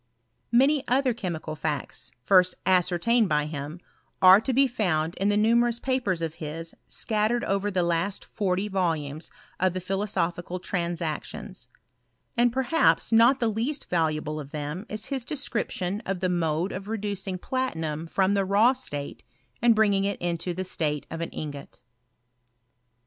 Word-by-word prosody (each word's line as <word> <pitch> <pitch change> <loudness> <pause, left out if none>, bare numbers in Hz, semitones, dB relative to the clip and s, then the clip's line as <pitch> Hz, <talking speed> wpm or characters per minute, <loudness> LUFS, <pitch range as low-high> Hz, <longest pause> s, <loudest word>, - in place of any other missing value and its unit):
Many 270 +4 +4
other 255 0 +2
chemical 170 -8 -4
facts, 150 -3 -4
first 185 +3 +4
ascertained 185 +5 +3
by 150 -1 +2
him, 150 +2 -6 0.4
are 185 +2 +8
to 265 - -1
be 270 +2 +4
found 175 -10 0
in 200 +1 +1
the 205 - +2
numerous 235 +2 +3
papers 240 -11 -1
of 160 -1 -2
his 165 +2 -5
scat 215 -1 0
tered 240 0 0
over 195 +1 0
the 185 -3 +1
last 170 +3 -1
forty 190 0 -1
volumes 165 -6 -2 0.3
of 185 -1 +2
the 185 - -2
Philosophical 180 -2 -2
Transactions: 170 -4 -4 0.7
and 240 0 +3
perhaps 265 +5 +2
not 235 +4 +6
the 235 - +2
least 235 +7 -2
valuable 155 -2 0
of 140 -2 -8
them 150 +7 -5
is 215 0 -3
his 265 -3 -1
description 215 -8 -2
of 190 -1 -1
the 185 - 0
mode 170 +1 0
of 195 +2 -6
reducing 200 -3 -2
platinum 165 - -3
from 190 +3 +2
the 200 -1 +2
raw 205 +6 +4
state, 145 - -5 0.4
and 235 -1 +5
bringing 205 -2 +3
it 200 0 -1
into 175 +1 -2
the 185 - -2
state 150 -5 -2
of 165 - -4
an 165 - -2
ingot. 145 -2 -7
185 Hz, 155 wpm, -26 LUFS, 165-225 Hz, 0.7 s, are